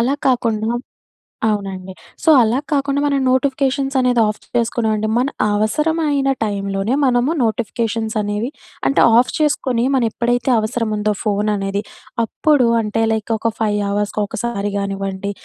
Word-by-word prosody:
అలా 250 Hz, +4 st, +2 dB
కాకుండా 230 Hz, -4 st, 0 dB, 0.8 s
అవునండి. 190 Hz, -3 st, -3 dB, 0.3 s
సో, -, -, +3 dB
అలా 230 Hz, +2 st, +2 dB
కాకుండా 280 Hz, -1 st, +1 dB
మనం 280 Hz, -1 st, +1 dB
నోటిఫికేషన్స్ 270 Hz, +1 st, 0 dB
అనేది 250 Hz, -2 st, +3 dB
ఆఫ్ 210 Hz, 0 st, -2 dB, 0.2 s
చేసుకున్నామండి. 220 Hz, -2 st, 0 dB
మన 250 Hz, +2 st, +2 dB, 0.3 s
అవసరమైన 290 Hz, +5 st, +1 dB
టైంలోనే 200 Hz, +2 st, -2 dB
మనము 250 Hz, +3 st, +2 dB
నోటిఫికేషన్సనేవి 220 Hz, -1 st, -1 dB, 0.4 s
అంటే 275 Hz, -, +3 dB, 0.2 s
ఆఫ్ 250 Hz, -, +1 dB
చేసుకొని, 260 Hz, -5 st, +1 dB
మనం 255 Hz, -3 st, +2 dB
ఎప్పుడైతే 245 Hz, +2 st, 0 dB
అవసరం 220 Hz, +1 st, -2 dB
ఉందో 210 Hz, 0 st, 0 dB
ఫోను 210 Hz, 0 st, 0 dB
అనేది 195 Hz, +1 st, -2 dB, 0.4 s
అప్పుడు 285 Hz, +1 st, +2 dB
అంటే 220 Hz, +1 st, -1 dB
లైక్ 220 Hz, +1 st, -1 dB
ఒక 230 Hz, +1 st, -1 dB
5 210 Hz, -1 st, +1 dB
అవర్స్‌కి 205 Hz, +1 st, -1 dB
ఒకసారి 205 Hz, -1 st, -3 dB
కానివ్వండి, 195 Hz, 0 st, -3 dB
225 Hz, 130 wpm, -19 LUFS, 210-255 Hz, 0.8 s, సో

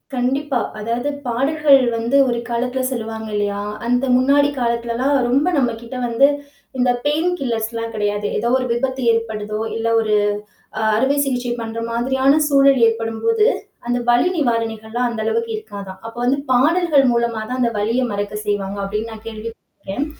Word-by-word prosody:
கண்டிப்பா. 265 Hz, +1 st, 0 dB, 0.2 s
அதாவது 235 Hz, +6 st, -2 dB, 0.2 s
பாடல்கள் 275 Hz, +3 st, +3 dB
வந்து 235 Hz, +4 st, +1 dB
ஒரு 240 Hz, -1 st, 0 dB
காலத்தில 250 Hz, +2 st, -1 dB
சொல்லுவாங்க 220 Hz, -2 st, -4 dB
இல்லயா! 205 Hz, -1 st, -1 dB, 0.3 s
அந்த 245 Hz, +2 st, +2 dB
முன்னாடி 280 Hz, +3 st, +4 dB
காலத்திலலாம் 235 Hz, +3 st, 0 dB
ரொம்ப 275 Hz, +7 st, +2 dB
நம்மகிட்ட 235 Hz, -1 st, -2 dB
வந்து 235 Hz, +4 st, +4 dB, 0.5 s
இந்த 250 Hz, 0 st, +2 dB, 0.2 s
பெயின் 315 Hz, +4 st, +2 dB
கில்லர்ஸ் 225 Hz, -4 st, -1 dB
எல்லாம் 230 Hz, 0 st, -4 dB
கிடையாது. 205 Hz, 0 st, -1 dB
ஏதோ 235 Hz, +3 st, 0 dB
ஒரு 255 Hz, -, -2 dB
விபத்து 260 Hz, +1 st, -2 dB
ஏற்படுதோ! 215 Hz, -2 st, -2 dB, 0.2 s
இல்ல 225 Hz, 0 st, -2 dB
ஒரு 215 Hz, -1 st, 0 dB, 0.7 s
அ -, -, -1 dB
அறுவை 265 Hz, +5 st, +2 dB
சிகிச்சை 250 Hz, -2 st, -2 dB
பண்ற 225 Hz, 0 st, -5 dB
மாதிரியான 265 Hz, +5 st, +2 dB
சூழல் 275 Hz, -2 st, +5 dB
ஏற்படும்போது 225 Hz, -, 0 dB, 0.4 s
அந்த 245 Hz, 0 st, +1 dB
வலி 240 Hz, +9 st, +4 dB
நிவாரணிகள்லாம் 230 Hz, -2 st, -1 dB
அந்த 230 Hz, -2 st, -5 dB
அளவுக்கு 460 Hz, -, -1 dB
இருக்காதாம். 200 Hz, -, -9 dB
அப்போ 230 Hz, +1 st, -8 dB
வந்து 270 Hz, +3 st, +2 dB
பாடல்கள் 300 Hz, +2 st, +4 dB
மூலமா 235 Hz, -2 st, 0 dB
தான், 255 Hz, 0 st, -3 dB
அந்த 235 Hz, -1 st, +2 dB
வலியை 235 Hz, +5 st, +1 dB
மறக்க 205 Hz, +1 st, -3 dB
செய்வாங்க. 200 Hz, -1 st, -2 dB
அப்பிடின்னு 210 Hz, +3 st, -3 dB
நான் 220 Hz, 0 st, -12 dB
கேள்வி 225 Hz, 0 st, -6 dB
பட்ருக்கேன். 230 Hz, +8 st, -6 dB
240 Hz, 150 wpm, -20 LUFS, 225-270 Hz, 0.7 s, சூழல்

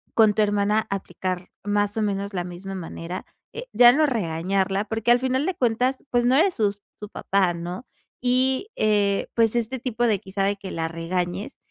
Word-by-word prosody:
con 220 Hz, -2 st, +5 dB
tu 215 Hz, -, +1 dB
hermana 205 Hz, +1 st, +1 dB
aplicar 185 Hz, -2 st, -4 dB
más 205 Hz, 0 st, 0 dB
o -, -, +1 dB
menos 200 Hz, 0 st, -2 dB
la 180 Hz, -1 st, -2 dB
misma 180 Hz, +2 st, -7 dB
manera. 175 Hz, 0 st, -6 dB, 0.3 s
Eh, 485 Hz, +2 st, -7 dB
ya 240 Hz, -1 st, +8 dB
no 310 Hz, +1 st, +3 dB
regañarla, 195 Hz, -, 0 dB
porque 225 Hz, +2 st, 0 dB
al 245 Hz, -, +5 dB
final 260 Hz, +3 st, 0 dB
de 375 Hz, -, 0 dB
cuentas, 250 Hz, +1 st, 0 dB
pues, 240 Hz, -1 st, +2 dB
no 255 Hz, +2 st, +4 dB
eres 355 Hz, +5 st, +3 dB
sus 205 Hz, -2 st, 0 dB, 0.2 s
su 210 Hz, -1 st, -8 dB
papá, 190 Hz, -5 st, +1 dB
¿no? 175 Hz, +8 st, -6 dB, 0.4 s
Y, 260 Hz, -, +1 dB
eh, 205 Hz, -, +1 dB
pues, 230 Hz, 0 st, +3 dB
este 235 Hz, +2 st, -1 dB
tipo 240 Hz, -1 st, -1 dB
de 205 Hz, -4 st, +2 dB
quizá 195 Hz, -1 st, -3 dB
de 200 Hz, +1 st, +1 dB
que 195 Hz, -1 st, -8 dB
la 165 Hz, 0 st, -2 dB
regañes, 175 Hz, +6 st, -3 dB
205 Hz, 190 wpm, -24 LUFS, 190-240 Hz, 0.4 s, ya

